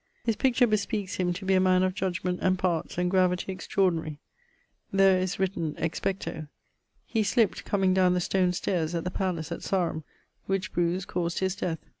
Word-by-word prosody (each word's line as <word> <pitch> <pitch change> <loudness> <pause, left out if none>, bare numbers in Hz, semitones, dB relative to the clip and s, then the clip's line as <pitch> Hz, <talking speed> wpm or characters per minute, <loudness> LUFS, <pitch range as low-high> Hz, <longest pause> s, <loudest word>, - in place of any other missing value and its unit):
His 225 -2 +1
picture 250 +2 +3
bespeakes 210 -2 -1
him 180 -1 +1
to 190 +2 -7
be 190 - +2
a 185 - +5
man 185 0 +4
of 185 0 +1
judgement, 180 -1 -2
and 185 0 +2
parts, 175 -3 -1
and 180 0 +1
gravity 185 0 +2
extraordinary. 170 -5 -1 0.7
There 195 -1 +5
is 185 0 -2
written 175 -5 -1
Expecto. 165 -1 -3 0.6
He 225 - 0
slipt 215 +1 +1
comeing 190 -2 +2
downe 185 -1 +4
the - - +2
stone 180 0 +1
stayres 175 -2 -1
at 165 - -1
the 180 - -3
palace 175 -4 -2
at 170 - -4
Sarum, 170 -5 -1 0.4
which 195 -1 -2
bruise 175 +2 0
caused 170 -1 -2
his 190 0 0
death. 180 -5 -2
185 Hz, 180 wpm, -27 LUFS, 175-195 Hz, 0.7 s, a